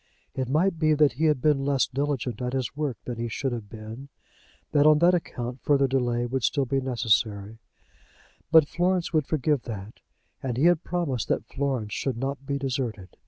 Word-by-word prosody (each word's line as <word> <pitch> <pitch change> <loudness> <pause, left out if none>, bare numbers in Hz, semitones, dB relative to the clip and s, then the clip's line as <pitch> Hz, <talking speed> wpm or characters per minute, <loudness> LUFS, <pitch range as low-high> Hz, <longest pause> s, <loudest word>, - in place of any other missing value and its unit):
It 130 -1 -3
might 165 +4 +1
be 155 -1 +3
that 150 -1 +4
he 155 +6 0
had 150 -5 +2
been 150 -3 +3
less 135 -2 +2
diligent 130 -4 -2
at 125 0 -2
his 130 -1 -2
work 145 -6 -2
than 120 -2 -5
he 120 - -2
should 130 +4 -2
have 115 -4 -5
been, 110 +5 -9 0.6
that 145 0 +4
on 155 -1 +7
that 170 +3 +5
account 125 -7 -3
further 140 -2 +3
delay 120 -2 0
would 130 +2 -2
still 140 +2 +1
be 135 +2 0
necessary; 110 -4 0 0.9
but 160 -3 +7
Florence 175 +1 0
would 155 -3 +2
forgive 150 -2 +1
that, 105 -2 -7 0.4
and 125 -3 -3
he 135 - +1
had 175 -1 +4
promised 155 - -2
that - - -1
Florence 130 -7 -2
should 130 -4 -2
not 135 +2 -4
be 140 - -1
deserted. 125 -8 -4
135 Hz, 190 wpm, -26 LUFS, 120-150 Hz, 0.9 s, on